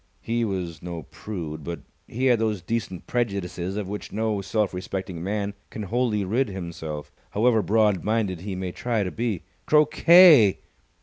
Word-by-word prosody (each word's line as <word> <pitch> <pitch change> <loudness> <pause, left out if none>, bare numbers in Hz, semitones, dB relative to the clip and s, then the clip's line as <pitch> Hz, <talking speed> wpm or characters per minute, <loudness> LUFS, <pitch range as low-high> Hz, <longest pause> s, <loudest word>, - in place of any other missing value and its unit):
He 115 +1 0
was 90 -6 -3
no 85 -2 -6
prude, 80 -7 -7
but 85 +1 -5 0.3
he 125 +4 -2
had 125 -3 +4
those 110 -4 -1
decent 110 -6 -3
prejudices 100 -5 -2
of 105 -3 -3
which 105 +1 -6
no 110 -2 -1
self 100 +1 -1
respecting 90 -2 -5
man 100 +1 -2 0.2
can 110 - -6
wholly 110 -1 0
rid 120 +7 +1
himself, 85 -6 -6 0.2
however 110 +1 +3
broad 105 -1 +2
minded 105 -5 0
he 95 0 -4
may 90 -1 -4
try 120 -1 -1
to 90 - -3
be. 110 -6 -2 0.2
"Croquet!" 155 - +7
100 Hz, 160 wpm, -25 LUFS, 90-115 Hz, 0.3 s, Croquet